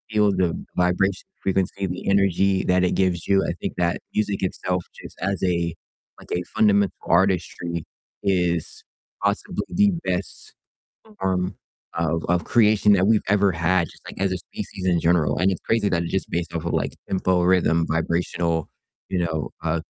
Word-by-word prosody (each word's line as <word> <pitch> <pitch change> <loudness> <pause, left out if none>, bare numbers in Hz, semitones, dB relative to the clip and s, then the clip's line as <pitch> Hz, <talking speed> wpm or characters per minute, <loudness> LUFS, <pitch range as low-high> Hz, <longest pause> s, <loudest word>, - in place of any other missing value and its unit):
feel 105 -1 +4
the 90 -3 +1 0.2
vibration, 90 +2 +1 0.2
frequency, 95 0 0
the 90 +1 -5
energy 100 -1 +3
that 90 0 +3
it - - +1
gives 90 -3 0
you. 95 -1 +4
I - - 0
think - - -3
that 85 -1 +1
music 105 -2 0
itself 90 -1 -2 0.2
just - - -11
as 95 +1 -1
a 85 -2 0 0.4
like - - -15
a 90 - 0
fundamental 100 -2 +3
artistry 85 -2 +1 0.4
is 90 -4 0 0.4
possibly 100 - -1
the 205 +2 +3
best 90 +1 -4 0.7
form 95 0 -1 0.4
of 80 0 -1
of 90 0 +1
creation 105 -2 +4
that 95 -1 +3
we've 110 -1 +4
ever 100 0 +3
had, 85 +1 +1
just - - -17
like - - -8
as 95 -1 +1
a 95 - -1
species 95 +1 -7
in 90 -2 +3
general, 85 -2 +2
and 95 +2 +3
it's 95 - -3
crazy 110 -3 +1
that 85 -2 +1
it's 85 - -5
just 95 - -1
based 85 0 -3
off 85 - -2
of - - -1
like - - 0 0.2
tempo, 95 -1 +1
rhythm, 85 -2 +3
vibrational, 85 0 -1 0.4
you 95 - 0
know, 80 -3 -2
uh 85 0 +1
90 Hz, 170 wpm, -23 LUFS, 85-100 Hz, 0.7 s, feel